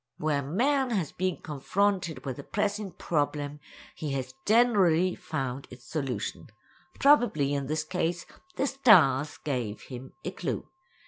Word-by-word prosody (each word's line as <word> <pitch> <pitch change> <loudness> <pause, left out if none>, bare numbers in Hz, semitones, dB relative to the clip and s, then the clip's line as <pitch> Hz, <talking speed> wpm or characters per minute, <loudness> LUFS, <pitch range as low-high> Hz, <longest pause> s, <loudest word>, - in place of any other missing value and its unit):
Where 150 -2 0
man 255 - +1
has 190 - -1
been 185 -1 -1
confronted 175 +3 -1
with 130 -3 -4
a - - -6
pressing 205 0 -1
problem 145 -2 -1 0.3
he 150 -3 -4
has 130 -1 -3
generally 195 -6 +4
found 135 -3 -4
its 125 -1 -13
solution. 125 - -3 0.5
Probably 235 - +4
in 140 -1 -1
this 155 +1 -1
case 170 +1 -2 0.3
the 270 - +1
stars 170 - +5
gave 125 -7 -3
him 130 0 -9
a - - -2
clue. - - -4
155 Hz, 135 wpm, -28 LUFS, 135-200 Hz, 0.5 s, stars